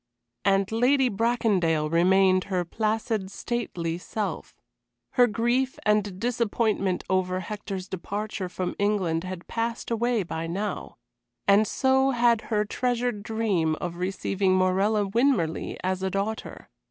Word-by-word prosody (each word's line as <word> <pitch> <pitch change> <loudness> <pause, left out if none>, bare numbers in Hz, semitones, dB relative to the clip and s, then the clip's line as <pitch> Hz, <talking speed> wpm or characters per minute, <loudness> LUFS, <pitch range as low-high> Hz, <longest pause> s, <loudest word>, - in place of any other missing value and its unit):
And 195 0 +2
Lady 255 +3 +3
Bracondale 195 -8 +1
remained 185 +3 +4
her 185 -3 -1
placid, 215 +1 -1
stately 180 -7 -3
self. 210 +3 -4 0.6
Her 245 -1 +5
grief 240 +4 0
and 210 -3 +1
disappointment 220 -4 0
over 185 -1 0
Hector's 195 -1 -5
departure 200 +1 -4
from 180 0 -3
England 190 -5 +1
had 185 -1 -6
passed 230 +1 -3
away 235 -1 +1
by 165 -1 -4
now, 195 +3 -4 0.5
as 200 +2 +5
so 265 0 +3
had 235 -3 +3
her 210 -2 +1
treasured 245 -1 -1
dream 205 -8 0
of 175 +1 -5
receiving 190 +1 0
Morella 195 +3 +2
Winmarleigh 200 - +1
as 185 0 -1
a 190 - 0
daughter. 200 +3 -4
205 Hz, 125 wpm, -26 LUFS, 185-230 Hz, 0.6 s, Her